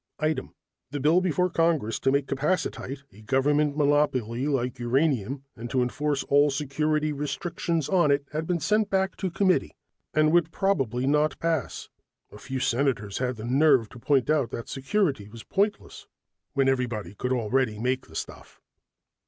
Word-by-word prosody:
Item: 155 Hz, +1 st, -2 dB, 0.3 s
the 145 Hz, +2 st, -4 dB
bill 155 Hz, +6 st, +4 dB
before 180 Hz, 0 st, +1 dB
Congress 165 Hz, -10 st, +1 dB
to 135 Hz, -, +2 dB
make 140 Hz, 0 st, +1 dB
capacitite 140 Hz, -1 st, -2 dB
a 105 Hz, -, -15 dB
government 145 Hz, +5 st, +1 dB
monopoly 140 Hz, -4 st, +1 dB
like 125 Hz, -3 st, -1 dB
uranium, 130 Hz, 0 st, 0 dB
and 120 Hz, +1 st, -7 dB
to 130 Hz, 0 st, +1 dB
enforce 145 Hz, +3 st, -1 dB
all 145 Hz, +1 st, +4 dB
security 150 Hz, +2 st, 0 dB
restrictions 160 Hz, +2 st, -2 dB
on 175 Hz, -5 st, +3 dB
it, 140 Hz, 0 st, +2 dB
had 155 Hz, +1 st, -3 dB
been 175 Hz, -1 st, 0 dB
sent 210 Hz, +5 st, +1 dB
back 190 Hz, 0 st, 0 dB
to 190 Hz, -, -2 dB
committee 185 Hz, +1 st, +1 dB, 0.4 s
and 155 Hz, 0 st, +3 dB
would 170 Hz, -1 st, +3 dB
probably 135 Hz, -, 0 dB
not 150 Hz, +2 st, +2 dB
pass. 165 Hz, -6 st, -2 dB, 0.4 s
A 105 Hz, -, -12 dB
few 130 Hz, +2 st, -4 dB
senators 120 Hz, -6 st, 0 dB
had 125 Hz, -, 0 dB
had 125 Hz, -, -3 dB
the 110 Hz, -, -6 dB
nerve 130 Hz, -3 st, +3 dB
to 120 Hz, -, -12 dB
point 135 Hz, +1 st, +2 dB
out 145 Hz, -6 st, +1 dB
that 115 Hz, -, -6 dB
security 135 Hz, -, -1 dB
was 115 Hz, +1 st, -11 dB
pointless 205 Hz, +2 st, -2 dB, 0.5 s
when 135 Hz, -2 st, +2 dB
everybody 120 Hz, -8 st, -1 dB
could 125 Hz, +5 st, -3 dB
already 120 Hz, -1 st, 0 dB
make 125 Hz, +3 st, -1 dB
the 80 Hz, -, -15 dB
stuff. -, -, -7 dB
140 Hz, 165 wpm, -26 LUFS, 125-155 Hz, 0.5 s, bill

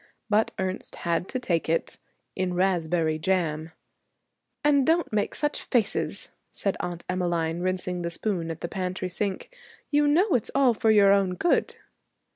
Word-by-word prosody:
But 215 Hz, +1 st, +3 dB
Ernest 190 Hz, 0 st, -4 dB
had 170 Hz, +2 st, -1 dB
to 260 Hz, -, -3 dB
take 175 Hz, -11 st, -1 dB
it 165 Hz, -, -1 dB, 0.4 s
in 185 Hz, -1 st, -1 dB
raspberry 170 Hz, -3 st, +1 dB
jam. 160 Hz, -3 st, 0 dB, 0.9 s
'And 290 Hz, -2 st, +4 dB
don't 325 Hz, -3 st, +1 dB
make 210 Hz, -1 st, 0 dB
such 295 Hz, 0 st, -1 dB
faces,' 230 Hz, -6 st, -1 dB, 0.2 s
said 195 Hz, -, -2 dB
Aunt 175 Hz, -1 st, -5 dB
Emmeline, 175 Hz, -2 st, -1 dB
rinsing 180 Hz, 0 st, -2 dB
the 170 Hz, -, -2 dB
spoon 170 Hz, -1 st, -2 dB
at 165 Hz, 0 st, -6 dB
the -, -, -2 dB
pantry 185 Hz, 0 st, -3 dB
sink. 200 Hz, -, -4 dB, 0.4 s
'You 295 Hz, 0 st, +4 dB
know 350 Hz, +9 st, +3 dB
it's 245 Hz, -5 st, +1 dB
all 270 Hz, -3 st, +5 dB
for 225 Hz, 0 st, +1 dB
your 205 Hz, -2 st, +6 dB
own 195 Hz, -2 st, +2 dB
good.' 340 Hz, -, +1 dB
185 Hz, 155 wpm, -26 LUFS, 170-220 Hz, 0.9 s, your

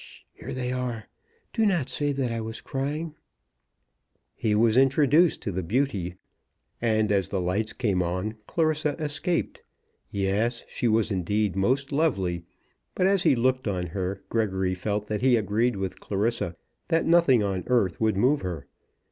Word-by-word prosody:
H -, -, -12 dB
sh. -, -, -15 dB
Here -, -, -9 dB
they 125 Hz, -1 st, -2 dB
are. 125 Hz, -4 st, -3 dB, 0.5 s
Do 225 Hz, -, +1 dB
not 175 Hz, -10 st, +2 dB
say 145 Hz, +3 st, -1 dB
that 135 Hz, -3 st, -1 dB
I 115 Hz, -1 st, -2 dB
was 110 Hz, +1 st, -5 dB
crying." 150 Hz, +4 st, -3 dB, 1.2 s
He 105 Hz, -2 st, 0 dB
was 110 Hz, +1 st, +3 dB
introduced 145 Hz, +5 st, +4 dB
to 100 Hz, -, -2 dB
the 95 Hz, +1 st, -2 dB
beauty, 100 Hz, -3 st, -1 dB, 0.7 s
and 110 Hz, -3 st, +2 dB
as 100 Hz, -4 st, +1 dB
the 95 Hz, -, -1 dB
lights 95 Hz, +5 st, -1 dB
came, 100 Hz, -7 st, 0 dB, 0.5 s
Clarissa 155 Hz, -3 st, +1 dB
escaped. 160 Hz, +3 st, -2 dB, 0.5 s
Yes; 100 Hz, +5 st, 0 dB
she 120 Hz, -, -2 dB
was 110 Hz, -1 st, +2 dB
indeed 100 Hz, +2 st, 0 dB
most 130 Hz, +9 st, +1 dB
lovely; 95 Hz, -, 0 dB, 0.5 s
but 185 Hz, -, +2 dB
as 195 Hz, -1 st, +3 dB
he 135 Hz, -, +4 dB
looked 130 Hz, +1 st, +1 dB
on 90 Hz, -3 st, -1 dB
her, 95 Hz, +2 st, -4 dB
Gregory 95 Hz, -5 st, 0 dB
felt 105 Hz, +3 st, -2 dB
that 105 Hz, 0 st, -3 dB
he 130 Hz, -1 st, +5 dB
agreed 110 Hz, +3 st, +1 dB
with 95 Hz, -1 st, -4 dB
Clarissa 100 Hz, -4 st, -1 dB, 0.3 s
that 165 Hz, -1 st, +2 dB
nothing 165 Hz, -9 st, +5 dB
on 95 Hz, -2 st, -1 dB
earth 115 Hz, -9 st, +1 dB
would 110 Hz, -3 st, +2 dB
move 130 Hz, +8 st, +3 dB
her. 85 Hz, -6 st, -5 dB
115 Hz, 160 wpm, -26 LUFS, 100-135 Hz, 1.2 s, he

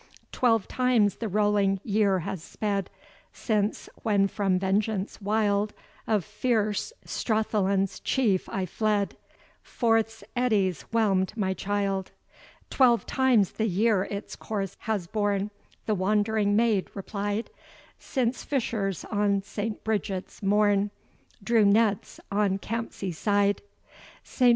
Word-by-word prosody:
"Twelve 225 Hz, -5 st, +2 dB
times 250 Hz, -5 st, +2 dB
the 230 Hz, -, -3 dB
rolling 205 Hz, -1 st, +2 dB
year 200 Hz, -3 st, +2 dB
has 165 Hz, +1 st, -4 dB
sped, 200 Hz, +2 st, -2 dB, 0.4 s
Since, 210 Hz, -2 st, -1 dB
when 200 Hz, -3 st, +3 dB
from 195 Hz, -2 st, 0 dB
vengeance 195 Hz, +2 st, -1 dB
wild 205 Hz, 0 st, +1 dB, 0.3 s
Of 210 Hz, -6 st, +1 dB
fierce 220 Hz, -, 0 dB
Strathallan's 200 Hz, -3 st, 0 dB
Chief 215 Hz, -9 st, +1 dB
I 190 Hz, -1 st, -2 dB
fled, 205 Hz, +2 st, 0 dB, 0.5 s
Forth's 225 Hz, -2 st, 0 dB
eddies 200 Hz, -, +1 dB
whelm'd 205 Hz, -3 st, +1 dB
my 190 Hz, -3 st, 0 dB
child." 195 Hz, -1 st, -1 dB, 0.6 s
"Twelve 245 Hz, -3 st, +4 dB
times 250 Hz, -7 st, +3 dB
the 220 Hz, -, -1 dB
year 200 Hz, 0 st, +2 dB
its 200 Hz, 0 st, -6 dB
course 195 Hz, -3 st, -4 dB
has 205 Hz, -5 st, 0 dB
born," 205 Hz, +1 st, -1 dB, 0.3 s
The 215 Hz, -, +1 dB
wandering 205 Hz, +1 st, +1 dB
maid 220 Hz, -4 st, +2 dB
replied, 205 Hz, +2 st, -3 dB, 0.5 s
"Since 255 Hz, -2 st, -1 dB
fishers 220 Hz, -, -2 dB
on 205 Hz, -2 st, +1 dB
St. 210 Hz, +2 st, -4 dB
Bridget's 205 Hz, -3 st, -3 dB
morn 205 Hz, 0 st, +3 dB, 0.5 s
Drew 225 Hz, +1 st, +4 dB
nets 205 Hz, 0 st, +2 dB
on 200 Hz, -1 st, +2 dB
Campsie 210 Hz, -3 st, -4 dB
side. 205 Hz, +3 st, +1 dB, 0.6 s
"St. 250 Hz, -2 st, +2 dB
205 Hz, 115 wpm, -27 LUFS, 195-220 Hz, 0.6 s, Twelve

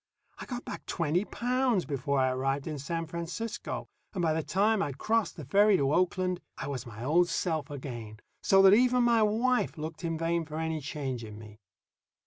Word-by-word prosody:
I -, -, -7 dB
got 245 Hz, -1 st, -5 dB
back -, -, -7 dB
twenty 170 Hz, +3 st, 0 dB
pounds 245 Hz, -5 st, 0 dB
before 140 Hz, 0 st, -1 dB
I 130 Hz, 0 st, +3 dB
arrived 135 Hz, +2 st, -1 dB
in 155 Hz, -3 st, -4 dB
San 165 Hz, +4 st, -3 dB
Francisco, 170 Hz, +8 st, -5 dB, 0.3 s
and 180 Hz, -, -1 dB
by 160 Hz, -2 st, +3 dB
the 160 Hz, -, 0 dB
time 205 Hz, +6 st, +2 dB
I'd 145 Hz, -7 st, -3 dB
crossed 225 Hz, +6 st, 0 dB
the 155 Hz, -, -8 dB
ferry 200 Hz, +7 st, +5 dB
to 140 Hz, -1 st, +1 dB
Oakland 185 Hz, 0 st, +1 dB, 0.2 s
I -, -, -5 dB
was 130 Hz, -4 st, -4 dB
my 115 Hz, 0 st, -8 dB
old 170 Hz, +6 st, +3 dB
self 160 Hz, -4 st, -1 dB
again, 120 Hz, -6 st, -7 dB, 0.2 s
so 195 Hz, 0 st, +5 dB
that 195 Hz, 0 st, +8 dB
even 250 Hz, +2 st, +4 dB
my 235 Hz, -2 st, +4 dB
wife 230 Hz, +1 st, +1 dB
looked 155 Hz, +3 st, -6 dB
in 165 Hz, -1 st, -1 dB
vain 165 Hz, +1 st, 0 dB
for 155 Hz, 0 st, -7 dB
any 160 Hz, -1 st, -2 dB
change 135 Hz, -4 st, -4 dB
in 105 Hz, -1 st, -9 dB
me. 105 Hz, -1 st, -12 dB
165 Hz, 195 wpm, -29 LUFS, 140-200 Hz, 0.3 s, that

